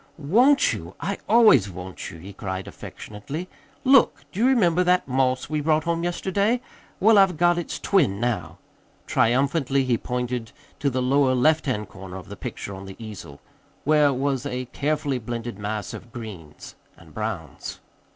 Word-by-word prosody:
"Want 240 Hz, -, +4 dB
you? -, -, -7 dB
I -, -, -3 dB
always 215 Hz, -, +6 dB
want 90 Hz, 0 st, -7 dB
you!" 80 Hz, -, -10 dB
he 95 Hz, +5 st, -10 dB
cried 95 Hz, -1 st, -5 dB
affectionately. 140 Hz, -, -7 dB, 0.4 s
"Look! 265 Hz, 0 st, +4 dB
Do 190 Hz, -, -6 dB
you 240 Hz, -, +4 dB
remember 180 Hz, -9 st, +3 dB
that 180 Hz, 0 st, +2 dB
moss 130 Hz, -1 st, +1 dB
we 155 Hz, 0 st, -1 dB
brought 155 Hz, +1 st, +2 dB
home 170 Hz, 0 st, -1 dB
yesterday? 200 Hz, +6 st, 0 dB, 0.4 s
Well, 215 Hz, +1 st, +6 dB
I've 190 Hz, -4 st, +4 dB
got 175 Hz, +1 st, +3 dB
its 170 Hz, -, -4 dB
twin 140 Hz, -, +2 dB
now." 120 Hz, -1 st, -2 dB, 0.5 s
Triumphantly 135 Hz, +3 st, +2 dB
he 120 Hz, -3 st, +1 dB
pointed 125 Hz, -2 st, -3 dB, 0.3 s
to 140 Hz, -, +1 dB
the 130 Hz, -1 st, -1 dB
lower 130 Hz, 0 st, +3 dB
left 155 Hz, +4 st, +3 dB
hand 105 Hz, -6 st, -1 dB
corner 95 Hz, -1 st, -9 dB
of 95 Hz, -, -11 dB
the -, -, -7 dB
picture 100 Hz, -, -6 dB
on 95 Hz, 0 st, -8 dB
the 95 Hz, -, -9 dB
easel, 105 Hz, -10 st, -9 dB, 0.4 s
where 150 Hz, -1 st, +4 dB
was 135 Hz, -1 st, -1 dB
a 125 Hz, -1 st, -3 dB
carefully 145 Hz, -2 st, -1 dB
blended 115 Hz, -2 st, -5 dB
mass 105 Hz, +1 st, -4 dB
of 120 Hz, -, -10 dB
greens 100 Hz, -11 st, -9 dB, 0.2 s
and 80 Hz, -2 st, -17 dB
browns. 105 Hz, -, -5 dB
130 Hz, 165 wpm, -24 LUFS, 105-165 Hz, 0.5 s, always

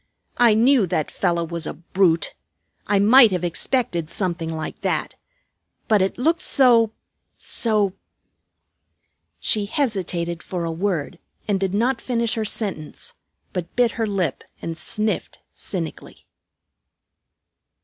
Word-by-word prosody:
"I 235 Hz, -3 st, +6 dB
knew 235 Hz, -2 st, +4 dB
that 155 Hz, -3 st, -1 dB
fellow 170 Hz, -3 st, 0 dB
was 170 Hz, -1 st, -4 dB
a -, -, -5 dB
brute. 170 Hz, +1 st, +1 dB, 0.5 s
I 205 Hz, -, +3 dB
might 225 Hz, +4 st, +7 dB
have 180 Hz, -3 st, -2 dB
expected 175 Hz, -1 st, 0 dB
something 170 Hz, -4 st, -2 dB
like 160 Hz, -1 st, -5 dB
that. -, -, -1 dB, 0.7 s
But 210 Hz, -3 st, +4 dB
it 190 Hz, -, 0 dB
looked 325 Hz, +7 st, +1 dB
so 235 Hz, -5 st, +4 dB, 0.5 s
so 210 Hz, -4 st, 0 dB, 0.7 s
" -, -, -54 dB, 0.7 s
She 210 Hz, -2 st, +1 dB
hesitated 185 Hz, -, -2 dB
for 175 Hz, -2 st, -4 dB
a 165 Hz, -, -2 dB
word, 170 Hz, -1 st, -2 dB, 0.3 s
and 200 Hz, -2 st, +1 dB
did 195 Hz, 0 st, -1 dB
not 240 Hz, +3 st, +1 dB
finish 235 Hz, -2 st, 0 dB
her 220 Hz, -1 st, -1 dB
sentence, 195 Hz, -8 st, -4 dB, 0.4 s
but 175 Hz, -2 st, -5 dB
bit 245 Hz, -2 st, +3 dB
her 225 Hz, -1 st, -2 dB
lip 185 Hz, -8 st, -2 dB, 0.2 s
and 165 Hz, -, -5 dB
sniffed 215 Hz, +5 st, -1 dB, 0.2 s
cynically. 170 Hz, -5 st, -6 dB
195 Hz, 130 wpm, -22 LUFS, 170-225 Hz, 0.7 s, might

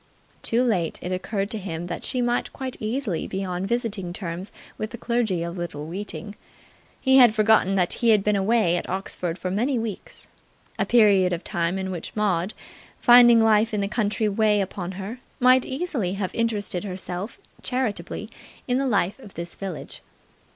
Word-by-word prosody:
Too 235 Hz, +2 st, +2 dB
late 190 Hz, -9 st, 0 dB
it 180 Hz, -, -3 dB
occurred 195 Hz, +3 st, -2 dB
to 220 Hz, -, +2 dB
him 175 Hz, -3 st, -5 dB
that 175 Hz, -1 st, -5 dB
she 250 Hz, -, -1 dB
might 240 Hz, 0 st, 0 dB
quite 260 Hz, -1 st, -5 dB
easily 215 Hz, -, -2 dB
be 195 Hz, 0 st, -3 dB
on 180 Hz, +1 st, -3 dB
visiting 210 Hz, -6 st, -2 dB
terms 180 Hz, 0 st, -5 dB, 0.2 s
with 215 Hz, -, -4 dB
the 235 Hz, -, -8 dB
clergy 225 Hz, -8 st, 0 dB
of 170 Hz, +1 st, -5 dB
Little 150 Hz, -4 st, -5 dB
Weeting. 205 Hz, +4 st, -6 dB, 0.7 s
He 265 Hz, -1 st, +4 dB
had 240 Hz, -4 st, +7 dB
forgotten 215 Hz, -3 st, +4 dB
that 180 Hz, -2 st, +2 dB
he 235 Hz, -, +4 dB
had 210 Hz, -3 st, +5 dB
been 210 Hz, 0 st, +2 dB
away 195 Hz, -3 st, +2 dB
at -, -, -5 dB
Oxford 180 Hz, -2 st, -3 dB
for 185 Hz, -, -4 dB
many 245 Hz, +7 st, +1 dB
weeks, 225 Hz, -3 st, -6 dB, 0.5 s
a -, -, +1 dB
period 200 Hz, -6 st, +5 dB
of 175 Hz, -, -4 dB
time 175 Hz, -1 st, -1 dB
in 190 Hz, 0 st, -3 dB
which 175 Hz, -3 st, -6 dB
Maud, 195 Hz, -2 st, 0 dB, 0.4 s
finding 240 Hz, -1 st, +8 dB
life 220 Hz, 0 st, +3 dB
in 205 Hz, -, 0 dB
the 200 Hz, -, 0 dB
country 215 Hz, 0 st, 0 dB
weigh 210 Hz, 0 st, +2 dB
upon 190 Hz, -1 st, -3 dB
her, 200 Hz, +6 st, -6 dB, 0.2 s
might 255 Hz, 0 st, +5 dB
easily 260 Hz, -, -2 dB
have 195 Hz, -2 st, -3 dB
interested 210 Hz, -5 st, -1 dB
herself 185 Hz, +1 st, -5 dB, 0.2 s
charitably 250 Hz, -4 st, -2 dB, 0.4 s
in 250 Hz, +1 st, +1 dB
the 275 Hz, -, 0 dB
life 200 Hz, -2 st, +1 dB
of 210 Hz, -7 st, -13 dB
this 170 Hz, 0 st, -6 dB
village. 190 Hz, -5 st, -6 dB
205 Hz, 180 wpm, -24 LUFS, 185-230 Hz, 0.7 s, finding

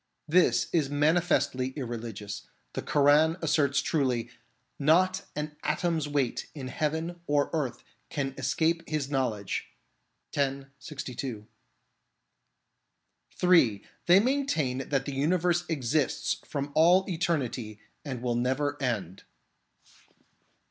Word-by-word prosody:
This 175 Hz, +4 st, +4 dB
is 155 Hz, -5 st, +2 dB
manifestly 145 Hz, -3 st, +1 dB
irreligious. 115 Hz, -6 st, -6 dB, 0.3 s
The -, -, -3 dB
Koran 150 Hz, +3 st, +4 dB
asserts 140 Hz, -4 st, +2 dB
truly, 125 Hz, -6 st, 0 dB, 0.5 s
"Not 180 Hz, +6 st, +3 dB
an 150 Hz, 0 st, -4 dB
atom's 165 Hz, -4 st, 0 dB
weight 140 Hz, -4 st, -1 dB
in 130 Hz, -3 st, -6 dB
heaven 160 Hz, +4 st, -2 dB
or 145 Hz, -1 st, +2 dB
earth 145 Hz, -6 st, -2 dB, 0.3 s
can 135 Hz, -3 st, -2 dB
escape 160 Hz, +5 st, +1 dB
His 145 Hz, -3 st, -2 dB
knowledge 115 Hz, -8 st, -1 dB, 0.4 s
" -, -, -19 dB
(x. 140 Hz, -1 st, 0 dB
62). 130 Hz, -5 st, -6 dB, 1.9 s
(3) 135 Hz, -, +4 dB, 0.2 s
They 175 Hz, +2 st, +8 dB
maintain 200 Hz, -, 0 dB
that 135 Hz, -2 st, 0 dB
the 140 Hz, -, -4 dB
universe 175 Hz, +5 st, +1 dB
exists 145 Hz, -1 st, 0 dB
from 140 Hz, -1 st, -3 dB
all 175 Hz, +5 st, +5 dB
eternity 135 Hz, -, -2 dB, 0.2 s
and 130 Hz, -5 st, -5 dB
will 120 Hz, -1 st, 0 dB
never 135 Hz, +4 st, 0 dB
end. 100 Hz, -9 st, -2 dB
145 Hz, 105 wpm, -28 LUFS, 130-160 Hz, 1.9 s, They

